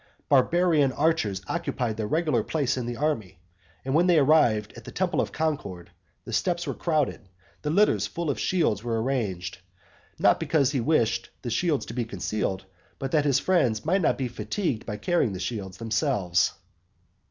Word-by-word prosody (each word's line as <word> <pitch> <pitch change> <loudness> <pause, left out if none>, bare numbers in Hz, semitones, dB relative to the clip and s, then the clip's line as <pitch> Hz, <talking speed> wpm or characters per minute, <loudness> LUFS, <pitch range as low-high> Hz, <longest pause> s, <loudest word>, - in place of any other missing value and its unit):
Barbarian 150 +1 +3
archers 120 - 0
occupied 115 -4 -2
their 110 -1 -3
regular 155 -4 +1
place 145 -5 0
in 125 -2 -3
the 120 -1 -4
army. 115 - -2 0.5
And 135 - -1
when 170 +4 +4
they 175 -2 +5
arrived 135 -8 +3
at - - -11
the - - -9
temple - - 0
of - - -3
Concord, 140 - -3 0.3
the - - -7
steps 175 -1 0
were 140 - -2
crowded, 150 - -1 0.3
the 150 - -2
litters 200 +7 +3
full 170 -3 -2
of - - -5
shields 140 - +1
were 115 -2 -1
arranged; 100 -8 -2 0.6
not - - +4
because 140 -5 +2
he 140 - 0
wished 115 -5 +1
the 120 - -3
shields 155 +3 0
to - - -8
be 120 -1 -2
concealed, 100 -2 -3 0.3
but 135 -1 -4
that 150 -2 +2
his 140 -3 +3
friends 135 - +1
might 185 +4 +2
not - - +2
be 130 - -1
fatigued 120 - -3
by 105 -2 -3
carrying 130 - +1
the 90 - -5
shields 95 -2 -4
themselves. 105 -5 +1
130 Hz, 175 wpm, -26 LUFS, 110-155 Hz, 0.6 s, they